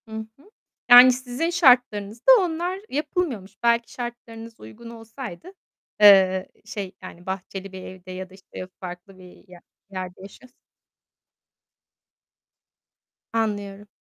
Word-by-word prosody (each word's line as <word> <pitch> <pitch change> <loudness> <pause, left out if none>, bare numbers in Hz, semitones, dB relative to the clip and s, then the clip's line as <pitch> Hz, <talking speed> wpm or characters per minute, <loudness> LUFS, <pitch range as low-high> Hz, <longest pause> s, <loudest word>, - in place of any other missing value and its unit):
Hı - - -16 0.3
hı. 295 +9 -22 0.4
Yani 245 +1 +10
sizin 255 +5 -3
şartlarınızda 245 - +3
onlar 355 +1 -2
yapılmıyormuş. 275 - -4
Belki 235 0 +2
şartlarınız 230 -2 -9
uygun 230 - -12
olsaydı, 230 - -10 0.5
eee, 190 -2 +6 0.2
şey, 205 -3 -6
yani 180 -1 -12
bahçeli 190 +1 -6
bir 190 -1 -9
evde 185 0 -11
ya 185 0 -7
da - - -19
işte 185 -1 -10
farklı 180 +1 -10
bir 180 +1 -16 0.5
yerde 185 -1 -7
yaşıyorsa 245 +6 -14 2.8
Anlıyorum. 205 -2 -3
215 Hz, 105 wpm, -23 LUFS, 190-245 Hz, 2.8 s, Yani